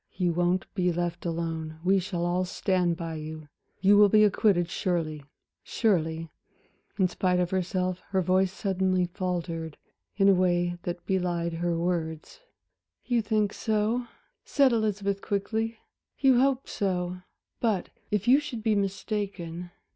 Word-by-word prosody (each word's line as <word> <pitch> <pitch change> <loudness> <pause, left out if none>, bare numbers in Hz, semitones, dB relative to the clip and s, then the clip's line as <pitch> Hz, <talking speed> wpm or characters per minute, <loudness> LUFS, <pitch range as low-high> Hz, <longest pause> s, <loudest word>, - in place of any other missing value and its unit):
You 180 -2 +1
won't 175 +2 +1
be 180 -3 +1
left 175 0 -2
alone, 165 -1 -3
we 190 +2 +4
shall 180 -2 -2
all 175 +1 +1
stand 180 -2 0
by 165 -2 -4
you, 155 0 -8 0.3
you 200 +2 +6
will 205 0 +7
be 215 +1 +6
acquitted 195 -4 +3
surely 160 -5 -2 0.4
surely" 165 -7 0 0.7
in 190 -3 +4
spite 180 0 0
of 180 -1 0
herself, 185 0 -1
her 190 -2 +1
voice 185 +1 +2
suddenly 190 -2 0
faltered, 175 -3 -4 0.4
in 195 -1 +4
a 195 - +7
way 175 -1 +1
that 175 0 -5
belied 175 -3 0
her 170 0 -1
words. 165 - -3 0.7
"You 240 -2 +2
think 215 -1 0
so?" 220 +2 0 0.5
Elizabeth 215 -7 +2
said, - - -25
quickly. 220 +3 -2 0.4
"You 265 -3 +4
hope 270 0 +2
so. 180 -2 -2 0.4
But 215 -6 0 0.2
if 210 +1 -1
you 265 +3 +7
should 245 -7 -6
be 220 -1 +3
mistaken?" 195 -4 -3
185 Hz, 140 wpm, -27 LUFS, 175-205 Hz, 0.7 s, will